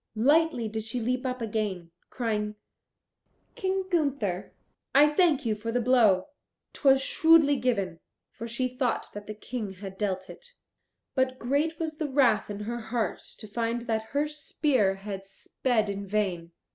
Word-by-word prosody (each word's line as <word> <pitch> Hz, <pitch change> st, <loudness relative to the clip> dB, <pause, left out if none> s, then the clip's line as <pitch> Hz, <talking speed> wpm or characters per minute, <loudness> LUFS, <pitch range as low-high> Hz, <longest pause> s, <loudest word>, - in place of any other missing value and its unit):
Lightly 285 Hz, 0 st, +3 dB
did 220 Hz, 0 st, -4 dB
she 225 Hz, +3 st, -3 dB
leap 255 Hz, +3 st, -1 dB
up 250 Hz, -1 st, -3 dB
again, 205 Hz, -6 st, -3 dB, 0.2 s
crying, 210 Hz, -3 st, -2 dB, 1.0 s
"King 380 Hz, -1 st, -1 dB
Gunther, 280 Hz, -, -1 dB, 0.4 s
I 295 Hz, +2 st, +7 dB
thank 300 Hz, -3 st, +3 dB
you 220 Hz, -, +2 dB
for 220 Hz, +2 st, -4 dB
the 245 Hz, -, +1 dB
blow; 230 Hz, -6 st, +4 dB, 0.4 s
'twas 270 Hz, -1 st, +4 dB
shrewdly 320 Hz, -1 st, +5 dB
given," 200 Hz, -9 st, -1 dB, 0.3 s
for 230 Hz, -, -7 dB
she 235 Hz, +2 st, -1 dB
thought 250 Hz, 0 st, -2 dB
that 205 Hz, 0 st, -8 dB
the 215 Hz, -, -6 dB
King 215 Hz, -2 st, -5 dB
had 190 Hz, 0 st, -9 dB
dealt 190 Hz, -3 st, -1 dB
it. -, -, -13 dB, 0.6 s
But 260 Hz, -1 st, +1 dB
great 290 Hz, +7 st, 0 dB
was 315 Hz, -2 st, -4 dB
the 305 Hz, -2 st, -1 dB
wrath 260 Hz, -7 st, +3 dB
in 205 Hz, 0 st, -5 dB
her 235 Hz, +3 st, -3 dB
heart 225 Hz, -3 st, -2 dB, 0.2 s
to 215 Hz, -, -10 dB
find 230 Hz, +2 st, -2 dB
that 220 Hz, -2 st, -1 dB
her 295 Hz, +1 st, +2 dB
spear 285 Hz, -8 st, +1 dB
had 195 Hz, 0 st, -6 dB
sped 220 Hz, +3 st, -1 dB
in 200 Hz, 0 st, -4 dB
vain. 185 Hz, -5 st, -1 dB
235 Hz, 160 wpm, -28 LUFS, 210-275 Hz, 1.0 s, I